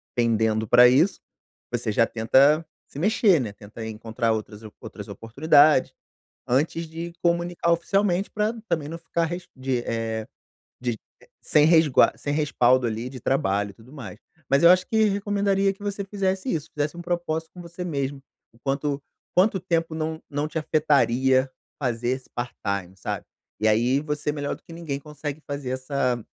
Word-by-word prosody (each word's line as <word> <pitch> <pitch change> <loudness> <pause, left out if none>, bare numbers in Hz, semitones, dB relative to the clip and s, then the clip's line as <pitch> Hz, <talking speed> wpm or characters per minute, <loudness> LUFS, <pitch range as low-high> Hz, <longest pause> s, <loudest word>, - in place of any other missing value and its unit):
pendendo 110 -2 +1
pra 125 +3 +8
isso, 145 +10 +3 0.5
você 120 -2 -1
já 115 +2 +3
tenta 135 +9 +3 0.2
se - - -11
mexer, 195 - +3
né, 110 -5 -4
tentar 105 +2 -10
encontrar 110 +1 -2
outras 110 -1 -5
op 110 -1 -11
outras - - -9
oportunidades, 145 +4 +3 0.5
antes 150 +6 0
de 165 +2 -6
comunicar 170 0 +1
oficialmente 190 +2 +1
pra 210 +1 0 0.2
também 150 -3 -1
não 165 +2 -6
ficar 170 0 -1
res 175 +2 -6
de 130 -1 -1
eh, 110 -1 -2 0.6
de, 120 -3 -2 0.4
sem 150 -1 +4
resgua 160 -4 +5
sem 145 - -3
respaldo 130 -4 +3
ali 115 +2 -3
de 130 -1 -9
trabalho, 100 -6 0
e - - -20
tudo 120 +6 -17
mais. 120 -7 -9 0.3
Mas 140 +1 +4
eu 170 - +9
acho 185 0 +5
que 220 -1 +3
recomendaria 200 -1 +1
que 195 - -22
você 200 0 -3
fizesse 195 +2 -1
isso, 160 -1 -3
fizesse 150 +3 -2
propósito 170 -2 -2
com 180 - -10
você 170 +1 -7
mesma, 140 -4 -2 0.3
em - - -22
quanto 140 +1 -1 0.3
quanto 190 +2 +4
tempo 165 -2 -1
não 160 0 -3
não 145 +1 -2
te 155 - -5
afetaria 130 -4 +2 0.3
fazer 120 -2 -1
esse 130 0 -3
part-time, 100 -6 -4
sabe. - - -4 0.3
E 110 - +2
aí 120 +5 +3
você, 150 0 -2
melhor 145 -1 -3
do - - -21
que 165 - -12
ninguém 160 -5 -4
consegue 150 0 -7
fazer 140 -3 -4
essa 130 -2 -1
145 Hz, 165 wpm, -24 LUFS, 120-170 Hz, 0.6 s, eu